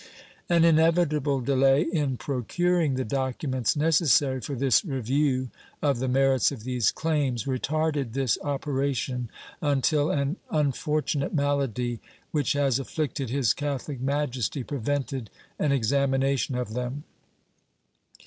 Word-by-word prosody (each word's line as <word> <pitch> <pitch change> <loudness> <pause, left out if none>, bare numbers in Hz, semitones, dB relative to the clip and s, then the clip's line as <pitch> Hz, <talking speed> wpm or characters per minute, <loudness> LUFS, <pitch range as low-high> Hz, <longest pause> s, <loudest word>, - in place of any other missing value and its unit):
An 170 -1 +4
inevitable 155 -4 +3
delay 135 +2 +3
in 150 -7 -1
procuring 155 +5 0
the 130 - -2
documents 130 0 -1
necessary 145 -4 +3
for 140 +5 -4
this 130 -3 +3
review 130 - 0 0.3
of 140 -5 +1
the 130 - -1
merits 135 +1 +3
of 125 -6 -8
these 125 -2 +1
claims 145 -8 -1
retarded 145 -1 -1
this 130 -4 +1
operation 135 -4 -2 0.3
until 145 +1 +2
an 140 +5 0
unfortunate 150 0 0
malady 135 -5 0 0.3
which 145 -4 +1
has 140 -3 +1
afflicted 135 -2 -3
His 125 -5 +2
Catholic 145 -2 -4
Majesty 135 -2 -1
prevented 135 -2 -3 0.3
an 150 - +1
examination 135 +1 +1
of 125 -3 -3
them. 125 +4 -4
140 Hz, 115 wpm, -26 LUFS, 130-145 Hz, 0.3 s, An